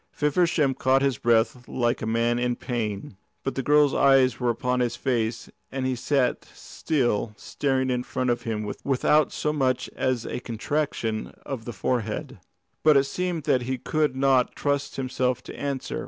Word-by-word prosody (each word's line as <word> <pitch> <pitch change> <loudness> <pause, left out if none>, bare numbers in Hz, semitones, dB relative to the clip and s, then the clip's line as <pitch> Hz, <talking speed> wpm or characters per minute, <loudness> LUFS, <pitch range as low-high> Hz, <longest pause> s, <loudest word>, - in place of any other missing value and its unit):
Feversham 150 -2 +2
caught 130 +1 +2
his 135 -4 +1
breath 120 +1 +2
like 120 -1 0
a 110 - -3
man 115 +1 +1
in 120 0 0
pain. 105 -6 -4 0.3
But 135 - -2
the 135 - -2
girl's 145 0 +4
eyes 130 -3 +4
were 125 -1 +1
upon 125 +2 0
his 120 -1 0
face, 120 -2 -1 0.2
and 130 -1 -2
he 130 -1 0
sat 130 0 0
still, 120 -8 -1
staring 130 -2 -1
in 125 -1 0
front 125 0 -1
of 120 0 -1
him 110 -2 -3 0.2
without 140 +2 +3
so 150 - -1
much 130 -4 0
as 130 -3 0
a - - -4
contraction 115 -2 -2
of 125 -5 -5
the 120 - -4
forehead. 120 +1 -2 0.4
But 155 -2 +6
it 135 - +5
seemed 175 +2 -3
that 140 -4 +2
he 130 +2 -2
could 150 +2 0
not 130 -2 +2
trust 145 -1 -1
himself 130 -1 -1
to - - -9
answer. 140 -2 -3
130 Hz, 170 wpm, -25 LUFS, 120-140 Hz, 0.4 s, But